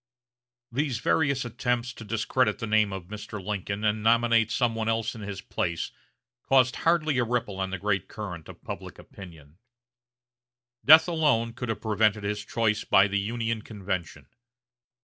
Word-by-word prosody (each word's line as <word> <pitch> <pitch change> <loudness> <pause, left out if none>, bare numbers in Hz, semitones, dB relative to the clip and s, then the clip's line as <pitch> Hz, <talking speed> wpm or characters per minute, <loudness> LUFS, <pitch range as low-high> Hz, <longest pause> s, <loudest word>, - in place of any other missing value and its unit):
These 135 0 -1
various 140 +1 +1
attempts 120 0 -2
to 115 - -10
discredit 115 +4 0
the 115 - -4
name 105 -2 +2
of 95 -3 -6
Mr. 105 0 -7
Lincoln 100 +1 -4
and 105 0 +1
nominate 115 0 +3
some 120 0 +1
one 110 0 -2
else 115 0 0
in 115 - -9
his 100 -1 -6
place 85 -2 -3 0.5
caused 130 -1 +3
hardly 155 -5 +2
a - - +3
ripple 115 -5 -2
on 95 0 -1
the 95 - -3
great 100 -1 -1
current 90 -7 -7
of - - -13
public - - -7
opinion. 80 -4 -13 1.2
Death 155 +4 +8
alone 145 -9 +1
could 125 0 -5
have 115 - -3
prevented 105 -1 +1
his 105 0 -2
choice 110 -1 0
by 95 +1 +5
the 100 0 0
Union 115 +2 -2
convention. 95 -5 -5
110 Hz, 160 wpm, -27 LUFS, 100-120 Hz, 1.2 s, Death